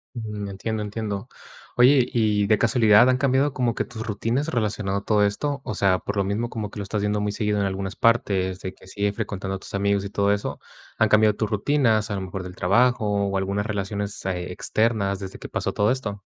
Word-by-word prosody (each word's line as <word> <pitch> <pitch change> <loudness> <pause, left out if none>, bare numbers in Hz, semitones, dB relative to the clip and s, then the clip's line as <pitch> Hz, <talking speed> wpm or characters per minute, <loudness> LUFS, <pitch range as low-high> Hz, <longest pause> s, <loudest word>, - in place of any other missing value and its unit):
Mm, 105 -3 -5
entiendo, 105 +3 -3
entiendo, 105 -1 -4 0.5
oye, 125 +1 +6
y, 105 -4 +1
¿de 105 0 +3
casualidad 115 0 +5
han 130 - +3
cambiado 135 +2 +2
como 125 -3 0
que, - - -1
tus 110 -2 -7
rutinas 115 +7 -1
relacionado 105 -6 -1
a - - -14
todo 105 -1 +3
esto? 140 +7 -2
O 110 - -4
sea, 95 -2 +2
por 100 +2 -5
lo 100 - +2
mismo, 105 +5 -2
como 110 -3 -4
que, - - -12
lo 100 - -3
estás 100 +2 -3
viendo 105 0 0
muy 105 0 -1
seguido 105 -1 -1
en 100 - +1
algunas 95 0 -3
partes, 95 -6 +1
de 95 0 -6
que - - -18
sigue 100 +2 -1
frecuentando 100 -3 -4
a - - -6
tus - - -11
amigos 100 0 +1
y 100 - -6
todo 100 0 +2
eso, 105 0 -2 0.4
¿han 110 - +4
cambiado 110 -1 +4
tus 110 0 -2
rutinas, 110 -2 +1
a - - -1
lo 95 - -3
mejor, 95 0 -5
del 90 0 -9
trabajo, 115 +5 +2 0.2
o 100 0 -1
algunas 100 +2 -1
relaciones, 100 -1 -3
eh, 90 -1 -3
externas 100 0 0
desde 95 -1 -8
que - - -8
pasó - - -2
todo 105 +1 +2
esto? 105 -6 -3
105 Hz, 225 wpm, -24 LUFS, 100-115 Hz, 0.5 s, oye